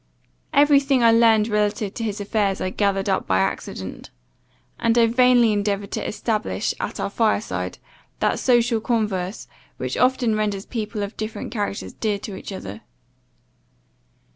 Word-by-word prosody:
Every 290 -1 +5
thing 275 -3 +1
I 230 - +7
learned 225 -2 +5
relative 210 -1 0
to 230 - -5
his 210 -1 -3
affairs 200 -1 0
I 185 - -2
gathered 195 -1 0
up 190 - 0
by 95 - +2
accident; 95 - -3 0.7
and 230 +1 +2
I 235 - +6
vainly 240 -1 +4
endeavoured 200 -1 -1
to - - -3
establish, 215 -1 -1
at - - -4
our - - -2
fire 220 -1 +2
side, 215 - -5 0.4
that - - +1
social 240 -2 +2
converse, 210 -5 -2 0.3
which - - -3
often 250 -2 +2
renders 205 -2 -1
people 215 -2 -4
of 200 +2 -6
different 215 0 -5
characters 205 -3 -3
dear 210 -2 -1
to 200 0 -7
each 190 - -8
other. 105 - -7
215 Hz, 155 wpm, -22 LUFS, 200-230 Hz, 0.7 s, I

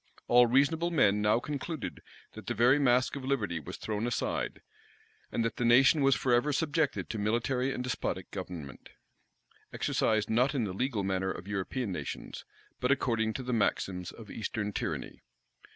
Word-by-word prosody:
All 120 0 +6
reasonable 145 +7 +3
men 105 -11 +3
now 105 +2 +3
concluded, 145 +2 -5 0.3
that - - -11
the - - -1
very 125 +6 +5
mask 125 -1 +3
of 140 - -6
liberty 110 -11 -1
was 75 - -8
thrown 110 +1 -2
aside, 120 - -2 0.7
and 115 - 0
that 115 - -2
the - - -1
nation 130 +5 +5
was 135 -1 +5
forever 125 +3 +2
subjected 150 0 0
to 110 - -4
military 120 +5 0
and 125 - -3
despotic 125 -7 -3
government, 85 -8 -7 0.8
exercised 110 -1 +1
not 125 +5 +2
in 125 - +1
the 100 -4 -3
legal 115 0 -1
manner 95 0 -1
of 95 0 -6
European 100 +3 -2
nations, 75 -6 -6 0.3
but 125 - 0
according 115 -5 +1
to 130 - -5
the 125 0 -2
maxims 95 -5 0
of 110 -2 -12
Eastern 105 -1 -3
tyranny. - - -4
120 Hz, 165 wpm, -30 LUFS, 105-135 Hz, 0.8 s, All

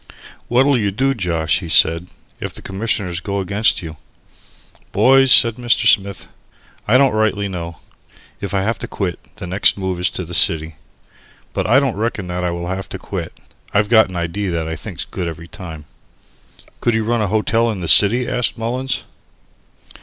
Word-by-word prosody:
"What'll 130 +2 +3
you 100 -2 0
do, 135 +7 0
Josh," 85 - 0
he - - -8
said, 85 +2 +3 0.3
"if - - -6
the - - -9
Commissioners 95 -3 -2
go 100 +2 -3
against 100 +1 +1
you?" 80 -2 -8 0.9
"Boys," 135 0 +5
said 115 -2 +6
Mr. 120 0 +1
Smith, 100 -3 +2 0.6
"I 115 +5 +5
don't 135 -1 +4
rightly 110 -2 0
know. 85 -4 -6 0.6
If 100 -2 -5
I 95 - +1
have 115 +3 -1
to - - -5
quit, 95 -4 -4 0.2
the 105 -3 -8
next 95 +4 +2
move 95 -2 -3
is 90 - +2
to 90 - -4
the 85 - -9
city. 80 -2 +1 0.8
But - - -2
I 125 +4 +6
don't 135 -7 -1
reckon 110 -2 -2
that 90 0 -3
I 90 - 0
will 85 0 -4
have 95 +2 -5
to - - -6
quit. - - -6 0.4
I've 105 0 +2
got 110 -3 +5
an 95 - -9
idee 85 +4 -3
that 85 -3 -2
I 80 - -4
think's 75 - -7
good 90 - -5
every 85 0 -7
time." 85 -7 -10 0.9
"Could 120 -2 +1
you 110 - 0
run 115 +1 0
a 105 - 0
hotel 110 +3 +1
in 105 -5 -4
the 85 - -4
city?" 120 +8 +6
asked 125 -1 -1
Mullins. 125 +3 -2
100 Hz, 185 wpm, -18 LUFS, 90-115 Hz, 0.9 s, said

